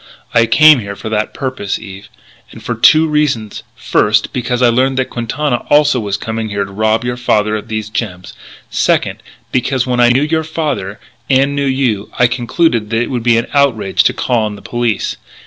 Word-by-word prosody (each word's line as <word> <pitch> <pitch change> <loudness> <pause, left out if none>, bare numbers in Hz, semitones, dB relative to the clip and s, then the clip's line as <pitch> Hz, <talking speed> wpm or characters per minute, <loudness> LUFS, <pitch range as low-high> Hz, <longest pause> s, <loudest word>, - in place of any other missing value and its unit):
"I 115 0 +4
came 145 +5 +6
here 100 -2 -6
for 110 - -7
that 110 -1 -1
purpose, 130 -7 -4
Eve. 100 -1 -11 0.4
And - - -13
for - - -2
two 160 +1 +5
reasons: 145 -9 -1
first, - - +1
because 125 0 -1
I 120 - +6
learned 130 +3 +1
that 130 - -1
Quintana 125 +3 -2
also 145 -3 +4
was 100 -3 -2
coming 110 +1 -4
here 100 -1 -2
to - - -12
rob 110 +3 0
your 120 0 -2
father 110 -3 +1
of 105 - -6
these 110 -1 -4
gems; 100 -5 -5 0.4
second, - - 0 0.3
because, 130 0 0
when 125 -1 -1
I 120 0 +5
knew 130 +4 +3
your 160 +1 0
father, 150 -11 -3 0.3
and 135 +1 +2
knew 140 -1 0
you, 125 -6 -1
I 125 - +4
concluded 120 -1 0
that 115 - -1
it - - -5
would 125 -2 -2
be 115 0 +3
an 115 - 0
outrage 130 -9 +2
to - - +3
call 120 -2 0
on 105 -1 -3
the 100 - -14
police. 120 -3 -2
120 Hz, 200 wpm, -15 LUFS, 110-135 Hz, 0.4 s, came